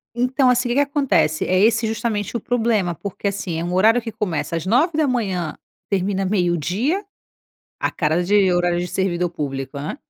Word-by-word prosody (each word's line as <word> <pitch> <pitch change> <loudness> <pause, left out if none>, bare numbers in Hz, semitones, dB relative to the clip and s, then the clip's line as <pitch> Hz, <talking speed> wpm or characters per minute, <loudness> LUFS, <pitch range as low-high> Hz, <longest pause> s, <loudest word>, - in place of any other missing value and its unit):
Então, 255 +2 +2
assim, 250 0 +2
o - - 0
que - - 0
que 280 - +3
acontece? 275 - +1
É 185 0 +2
esse 225 +2 +3
justamente 220 -1 -2
o - - 0
problema, 220 -7 0
porque, 200 +3 -5
assim, 185 -4 -3
é - - -3
um 175 +1 -3
horário 220 +6 +4
que 225 -1 -6
começa 165 -8 -3
às 165 +1 -3
9h, 240 - +1 0.3
termina 195 0 0
meio-dia. 190 - 0 0.8
A - - 0
cara 160 +2 0
de 195 0 +3
horário 175 0 +1
de 180 - -3
servidor 180 -2 -1
público, 140 -3 -5
hã. 145 +2 -5
195 Hz, 180 wpm, -21 LUFS, 175-235 Hz, 0.8 s, horário